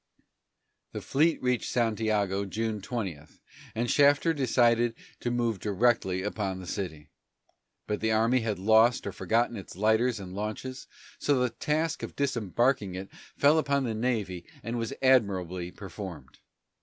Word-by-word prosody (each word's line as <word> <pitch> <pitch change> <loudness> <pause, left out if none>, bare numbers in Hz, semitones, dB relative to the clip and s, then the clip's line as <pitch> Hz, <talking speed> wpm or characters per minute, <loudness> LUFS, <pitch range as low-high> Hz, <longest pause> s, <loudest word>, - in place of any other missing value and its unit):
The - - -4
fleet 155 +4 +2
reached 125 -1 0
Santiago 110 -4 +1
June 110 +1 -3
20, 100 - -4 0.6
and 120 +2 0
Shafter 145 +3 +4
decided 120 -4 +2 0.2
to 120 - -2
move 120 -4 0
directly 105 -3 +1
upon 100 -2 -3
the 95 - -8
city. 80 -5 -5 0.7
But 105 - -2
the 110 0 0
army 115 +4 +3
had 110 -4 -2
lost 110 +5 +4
or - - -2
forgotten 120 +1 0
its 95 - -9
lighters 110 +4 +2
and 90 -2 -8
launches, 110 +6 -5 0.3
so 145 -2 +2
the 125 -1 +1
task 155 +1 -1
of - - -6
disembarking 120 -5 0
it 95 +1 -6 0.3
fell 150 +3 +5
upon 140 -2 +1
the 115 -3 -1
navy 110 -6 -2 0.2
and 115 +2 -3
was 115 -1 -3
admirably 95 -9 +2
performed. 90 -8 -9
110 Hz, 145 wpm, -28 LUFS, 100-125 Hz, 0.7 s, fell